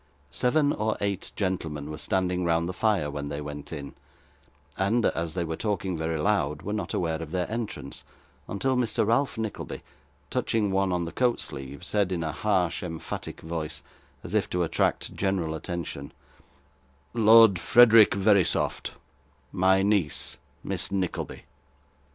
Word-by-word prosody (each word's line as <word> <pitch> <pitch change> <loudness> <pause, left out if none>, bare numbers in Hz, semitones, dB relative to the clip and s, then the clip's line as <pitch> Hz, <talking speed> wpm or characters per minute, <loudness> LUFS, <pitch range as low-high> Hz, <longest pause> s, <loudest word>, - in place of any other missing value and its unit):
Seven 145 +3 +2
or 110 +1 -1
eight 100 -2 -2
gentlemen 80 -7 -2
were 75 - -6
standing 90 0 0
round 85 0 +1
the 90 - -3
fire 95 -7 +1
when 70 0 -4
they 70 0 -4
went 75 -1 -7
in, 70 -4 -6 0.8
and, 110 +4 +1
as 85 0 -1
they 90 - 0
were 80 -1 -3
talking 100 -2 -2
very 80 0 -2
loud, 75 -5 0
were 105 - -3
not 105 - -3
aware 80 -2 -1
of 80 - -6
their 90 +1 -1
entrance 115 -1 -5 0.4
until 130 +7 0
Mr. 120 -4 +1
Ralph 115 +1 +1
Nickleby, 110 -2 -5 0.5
touching 105 -3 0
one 95 0 +1
on 90 -1 0
the 85 - -5
coat 125 -2 +1
sleeve, 70 +5 -6
said 100 +1 0
in 85 -3 -1
a 80 - -2
harsh 90 0 0
emphatic 80 -3 -6
voice, 80 -2 -5 0.4
as 90 - -6
if 105 -2 +1
to 90 0 0
attract 80 - 0
general 95 -5 -1
attention 80 -4 -5 1.0
'Lord 115 -4 +7
Frederick 115 +1 +7
Verisopht, 100 -2 +2 0.6
my 95 +1 +3
niece, 100 -7 0 0.2
Miss - - -2
Nickleby. 95 -3 -3
90 Hz, 150 wpm, -27 LUFS, 80-105 Hz, 1.0 s, Lord